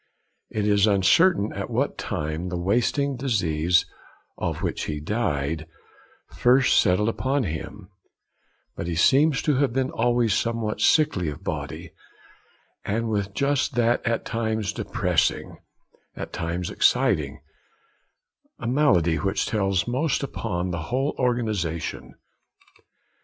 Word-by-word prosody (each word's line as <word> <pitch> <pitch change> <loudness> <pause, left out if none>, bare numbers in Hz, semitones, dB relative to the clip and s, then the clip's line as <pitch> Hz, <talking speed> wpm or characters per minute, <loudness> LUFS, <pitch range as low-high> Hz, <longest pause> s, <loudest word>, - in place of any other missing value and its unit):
It 105 -1 -2
is 100 0 +4
uncertain 105 - +3
at - - -5
what - - -1
time 80 +4 -3
the 90 - -3
wasting 120 +9 0
disease, 90 - +1 0.5
of - - -3
which - - -2
he 75 -1 -3
died, 80 -4 -2 0.7
first 130 +2 +4
settled 90 +4 +2
upon 130 +4 0
him; 90 +2 -6 0.9
but 85 - -5
he 85 - -2
seems 135 - +4
to 150 -4 +2
have 135 -4 +1
been 130 0 0
always 120 -2 +1
somewhat 115 -1 -1
sickly 100 - +3
of 75 - -8
body, - - -5 0.9
and 115 +3 -1
with 100 -2 -2
just 140 -1 0
that 120 0 +2
at 115 -1 -1
times 110 -2 -2
depressing, 90 -6 -1 0.6
at - - -7
times 85 0 -3
exciting, - - +2 1.2
malady 105 - +2
which 95 +6 -1
tells 95 -2 0
most 135 +4 0
upon 90 -9 -3
the 85 -1 -4
whole 135 +4 0
organisation. 85 - -2
105 Hz, 120 wpm, -24 LUFS, 90-125 Hz, 1.2 s, is